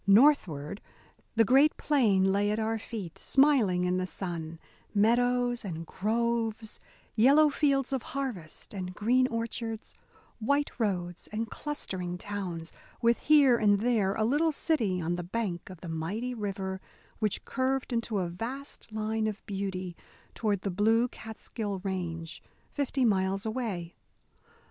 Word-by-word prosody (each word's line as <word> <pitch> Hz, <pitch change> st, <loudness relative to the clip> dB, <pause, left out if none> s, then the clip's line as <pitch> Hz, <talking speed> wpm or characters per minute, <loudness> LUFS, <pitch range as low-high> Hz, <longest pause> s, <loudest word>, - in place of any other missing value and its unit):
Northward, 200 Hz, -, +4 dB, 0.5 s
the 225 Hz, 0 st, +5 dB
great 275 Hz, +7 st, +5 dB
plain 205 Hz, -10 st, +3 dB
lay 200 Hz, +1 st, +2 dB
at 210 Hz, -, 0 dB
our 225 Hz, 0 st, 0 dB
feet, 205 Hz, -7 st, -7 dB
smiling 255 Hz, -11 st, +3 dB
in 180 Hz, 0 st, +1 dB
the 185 Hz, 0 st, -1 dB
sun; 170 Hz, -4 st, -5 dB, 0.4 s
meadows 245 Hz, +3 st, +3 dB
and 165 Hz, -4 st, -5 dB
groves, 225 Hz, +2 st, -1 dB, 0.4 s
yellow 285 Hz, +7 st, +6 dB
fields 275 Hz, -3 st, +1 dB
of 265 Hz, -, 0 dB, 0.2 s
harvest 220 Hz, -, -5 dB
and 185 Hz, -2 st, -5 dB
green 250 Hz, +4 st, +3 dB
orchards, 230 Hz, -1 st, -4 dB, 0.5 s
white 285 Hz, +6 st, +1 dB
roads 180 Hz, -5 st, -2 dB
and 220 Hz, +1 st, -3 dB
clustering 185 Hz, -12 st, -4 dB
towns, 180 Hz, -5 st, -5 dB, 0.3 s
with 235 Hz, 0 st, +3 dB
here 285 Hz, -5 st, +6 dB
and 205 Hz, -2 st, +4 dB
there 215 Hz, -5 st, +2 dB
a 220 Hz, -, +1 dB
little 300 Hz, +7 st, +3 dB
city 235 Hz, -, +1 dB
on 175 Hz, +1 st, -1 dB
the 175 Hz, -, -3 dB
bank 185 Hz, -2 st, -3 dB
of 185 Hz, -3 st, -11 dB
the 180 Hz, -, -7 dB
mighty 190 Hz, +10 st, -3 dB
river 195 Hz, -4 st, -4 dB, 0.4 s
which 215 Hz, -3 st, 0 dB
curved 260 Hz, -1 st, -1 dB
in 230 Hz, -, +2 dB
a 195 Hz, -4 st, 0 dB
vast 235 Hz, +9 st, -6 dB
line 220 Hz, 0 st, -1 dB
of 215 Hz, -1 st, -5 dB
beauty 190 Hz, -3 st, -4 dB, 0.4 s
toward 205 Hz, -4 st, 0 dB
the 195 Hz, -, -2 dB
blue 225 Hz, +5 st, +3 dB
Catskill 220 Hz, -2 st, -5 dB
Range, 170 Hz, -4 st, -4 dB, 0.3 s
fifty 275 Hz, -2 st, 0 dB
miles 195 Hz, -1 st, +1 dB
away. 215 Hz, -7 st, -3 dB
215 Hz, 140 wpm, -29 LUFS, 185-245 Hz, 0.5 s, yellow